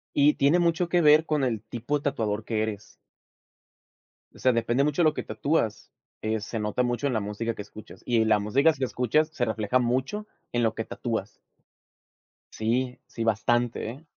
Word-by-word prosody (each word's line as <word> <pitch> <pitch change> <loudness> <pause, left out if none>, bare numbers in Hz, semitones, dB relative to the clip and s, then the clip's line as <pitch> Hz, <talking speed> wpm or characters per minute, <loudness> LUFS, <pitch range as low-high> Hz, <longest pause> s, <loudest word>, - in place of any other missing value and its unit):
Y, 145 +1 +5
tiene 145 +5 +4
mucho 170 0 +1
que 175 0 +3
ver 155 +1 +6
con 150 -3 0
el 115 -5 0
tipo 120 +6 -3
de - - -17
tatuador 110 -7 -1
que 110 -1 -1
eres 105 -2 -6 1.4
o - - -16
sea, 130 - +4
depende 120 +3 +1
mucho 150 +3 +1
lo 155 -1 +4
que - - -4
tatúas, 110 0 -1 0.3
eh, 110 0 -1
se 110 +1 -5
nota 105 +4 0
mucho 120 +3 -1
en 130 - -1
la 110 - +1
música 105 +3 -3
que - - -6
escuchas 105 +1 -12
y 115 -2 +2
la 105 -1 +4
músicas 135 +9 +2
que 135 - 0
escuchas 125 +6 +1
se 140 -6 -1
refleja 110 +2 0
mucho, 130 - -1 0.2
en 120 0 0
lo 110 -1 +1
que 110 - -3
tatúas. 110 -4 -4 1.2
Sí, 125 +3 -1
sí, 115 - -5
bastante, 115 +1 +1
¿eh? 145 +6 -13
120 Hz, 185 wpm, -26 LUFS, 110-145 Hz, 1.4 s, ver